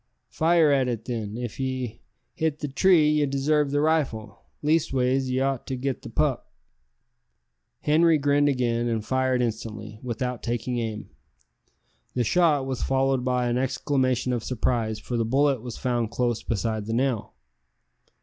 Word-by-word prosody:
"Fire 165 -2 +3
at 135 -2 +3
it, 115 -2 -3
then. 110 -3 -4
If 120 -1 -5
ye 130 -3 -3 0.3
hit 160 -2 -1
the 150 - -4
tree 160 +3 +4
ye 150 -1 +2
desarve 140 +2 +1
the 145 +1 +1
rifle 150 -9 0 0.2
leastways 135 -4 +1
ye 130 0 0
ought 135 -1 -1
to 130 - -2
get 130 +1 -3
the - - -9
pup." - - -1 1.3
Henri 160 +2 +4
grinned 145 0 +3
again, 120 -3 0
and 110 -2 -1
fired 130 -1 +1
instantly, 110 -2 -5
without 125 0 -3
taking 120 +1 -2
aim. 110 -2 -5 1.0
The 125 - +2
shot 150 0 +3
was 130 -1 -3
followed 135 -1 +1
by 125 -1 +1
an 120 +1 0
exclamation 130 -1 0
of 120 -2 -2
surprise, 115 -3 -1
for 120 - -4
the 115 - +1
bullet 135 +2 +2
was 120 -1 -7
found 120 -3 -1
close 120 -1 -1
beside 110 -1 -2
the 115 - -2
nail. 125 -2 -1
130 Hz, 155 wpm, -25 LUFS, 120-140 Hz, 1.3 s, tree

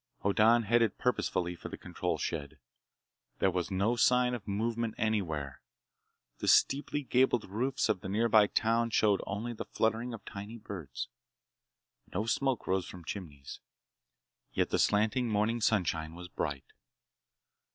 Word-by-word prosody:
Hoddan 110 +4 +4
headed 115 0 +2
purposefully 90 -7 0
for - - -8
the - - -7
control - - -3
shed. 75 -2 -4 0.8
There 95 - +2
was 90 0 -2
no 100 +5 +1
sign 125 +1 +3
of 115 -4 -5
movement 115 +2 -1
anywhere. 80 -11 -1 0.8
The - - -3
steeply 145 +1 +3
gabled 125 -2 +2
roofs 120 +7 0
of 90 - 0
the 95 - -6
nearby 110 0 +4
town 115 +2 +1
showed 105 -3 +3
only 110 +5 -3
the 110 - -6
fluttering 115 +2 0
of 110 - -13
tiny 100 +4 -7
birds. 95 - -6 1.0
No 105 +4 -1
smoke 130 +1 0
rose 95 -1 0
from 90 -2 -10
chimneys. 75 -9 -7 0.9
Yet - - 0
the - - +1
slanting 110 +4 +2
morning 110 +2 +1
sunshine 85 -7 0
was 90 0 -9
bright. 70 -6 -3
105 Hz, 140 wpm, -31 LUFS, 95-115 Hz, 1.0 s, Hoddan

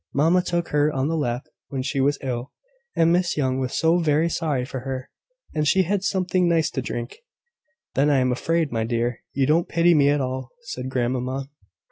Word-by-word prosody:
Mamma 165 +6 +4
took 175 -1 -2
her 150 +1 +2
on 135 +1 -1
her - - 0
lap 125 -5 -1 0.2
when 135 -2 -3
she 135 0 -1
was 145 +2 +2
ill; 125 0 -3 0.4
and 165 0 +4
Miss 175 -2 +1
Young 130 -2 +1
was 130 -1 -2
so 165 +2 +3
very 160 0 +2
sorry 150 -7 -1
for 130 0 -5
her; 130 0 -5 0.4
and 150 -1 0
she 190 +5 +4
had 195 +2 -1
something 185 -2 +1
nice 165 -2 +2
to 130 - -2
drink. 120 - -5 0.7
"Then 140 +2 +3
I 145 - +4
am 130 -1 +2
afraid, 165 +4 0
my 115 -1 0
dear, 120 +1 -1
you 135 0 +2
don't 160 +5 +2
pity 170 +1 +4
me 145 -3 +4
at 145 0 +2
all," 130 -1 -4
said 130 - -5
grandmamma. 130 +2 -2
140 Hz, 200 wpm, -24 LUFS, 130-165 Hz, 0.7 s, Mamma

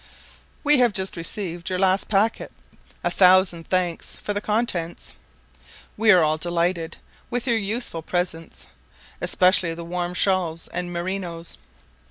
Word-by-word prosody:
We 295 -2 +5
have 240 -4 +4
just 190 0 0
received 170 0 -4
your 185 - -1
last 190 +1 +2
packet; 215 +2 +1 0.5
a - - 0
thousand 185 -3 +4
thanks 180 -2 -1
for 205 - -4
the 205 - -2
contents. 210 -7 -2 0.8
We 220 +1 +1
are 180 -5 +7
all 155 0 +1
delighted 170 0 -1 0.3
with 245 0 -2
your 235 -3 +2
useful 205 -4 -2
presents, 170 -1 -4 0.6
especially 180 -3 +3
the 170 0 -7
warm 175 +1 -3
shawls 175 -4 +1
and 175 0 -4
merinos. 175 -1 -4
180 Hz, 135 wpm, -23 LUFS, 170-200 Hz, 0.8 s, are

